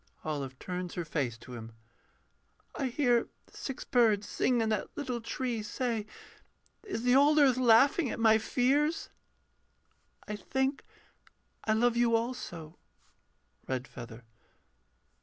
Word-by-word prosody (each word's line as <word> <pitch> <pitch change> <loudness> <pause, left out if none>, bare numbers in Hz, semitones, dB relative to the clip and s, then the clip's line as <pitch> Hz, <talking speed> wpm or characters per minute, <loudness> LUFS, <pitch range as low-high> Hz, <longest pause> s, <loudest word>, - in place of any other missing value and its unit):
OLIVE 140 -4 -4
[turns 180 +2 -5
her 175 - -3
face 135 -7 -2
to 125 +2 -12
him.] 115 -1 -8 1.0
I 275 - -2
hear 245 -2 +2 0.2
six 270 - -6
birds 220 -4 +3
sing 250 -2 +1
in 225 -1 +1
that 215 -3 -1
little 255 -5 -3
tree, 235 0 -3
Say, 220 0 -2 0.7
is 385 - -5
the 250 +1 +4
old 290 +3 +5
earth 275 -4 +6
laughing 255 +5 +5
at - - -4
my 220 -1 +5
fears? 280 +8 +1 1.2
I 210 - -3
think 265 +6 -1 0.8
I 220 - +2
love 235 +2 +2
you 235 -1 +3
also.... 205 -9 -4 0.9
REDFEATHER. 125 -2 -6
230 Hz, 120 wpm, -30 LUFS, 180-255 Hz, 1.2 s, earth